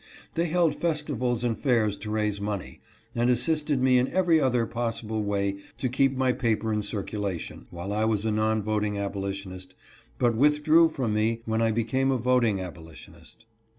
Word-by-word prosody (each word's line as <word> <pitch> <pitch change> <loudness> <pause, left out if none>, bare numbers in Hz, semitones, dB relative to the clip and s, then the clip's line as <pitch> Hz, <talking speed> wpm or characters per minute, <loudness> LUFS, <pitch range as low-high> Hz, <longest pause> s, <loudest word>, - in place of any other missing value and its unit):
They 170 +1 0
held 170 -1 +2
festivals 145 -7 -1
and 120 -2 0
fairs 115 -7 +1
to 105 +2 -7
raise 105 -2 -1
money, 100 -2 -5 0.3
and 120 +1 +1
assisted 145 +2 +1
me 130 -1 +5
in 125 - +1
every 175 -2 +3
other 125 -3 +2
possible 115 -2 -3
way 100 -1 -1 0.2
to 130 - -1
keep 135 +1 +1
my 130 -1 +2
paper 110 -3 0
in 105 - 0
circulation, 100 -3 -4
while 90 +4 -5
I 110 +1 +1
was 110 -1 0
a 110 - +1
non 110 0 +1
voting 105 -1 -1
abolitionist, 95 -2 -5 0.4
but 120 -2 +2
withdrew 150 +5 +4
from 125 -8 -2
me 115 +2 0
when 110 0 0
I 115 - +3
became 120 +4 0
a 135 - +2
voting 120 -4 +2
abolitionist. 85 +5 -11
115 Hz, 170 wpm, -26 LUFS, 105-130 Hz, 0.4 s, me